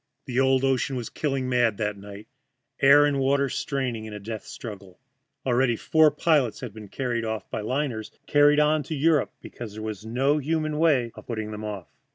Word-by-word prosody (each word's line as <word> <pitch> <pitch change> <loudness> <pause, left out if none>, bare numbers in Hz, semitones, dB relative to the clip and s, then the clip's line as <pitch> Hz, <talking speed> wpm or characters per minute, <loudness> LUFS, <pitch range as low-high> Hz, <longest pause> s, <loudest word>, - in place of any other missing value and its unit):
The 125 -1 -1
old 130 0 +3
ocean 135 0 +1
was 120 -3 -5
killing 135 -4 -2
mad 120 -4 +2
that 105 -1 -1
night, 100 +1 -11 0.5
air 140 +2 +7
and 145 -1 +1
water 140 +1 +2
straining 125 -7 -3
in 110 - -8
a - - -6
death 110 +1 -6
struggle, 100 -5 -9 0.5
and 130 - +1
already 120 -1 +3
four 155 +6 +4
pilots 145 -5 +1
had 125 -5 -6
been 110 -1 -10
carried 120 +1 -2
on 110 -3 -3
by - - -3
liners, 120 -2 -2 0.2
carried 145 0 +5
on 150 +1 +3
to 160 - -2
Europe 150 0 +2
because 115 -4 -9
there 110 - -6
was 110 -2 -5
no 135 +6 +1
human 155 +1 -1
way 140 -8 +3
of - - -13
putting 110 -2 -4
them 105 0 -6
off. 105 -4 -6
125 Hz, 200 wpm, -25 LUFS, 110-140 Hz, 0.5 s, air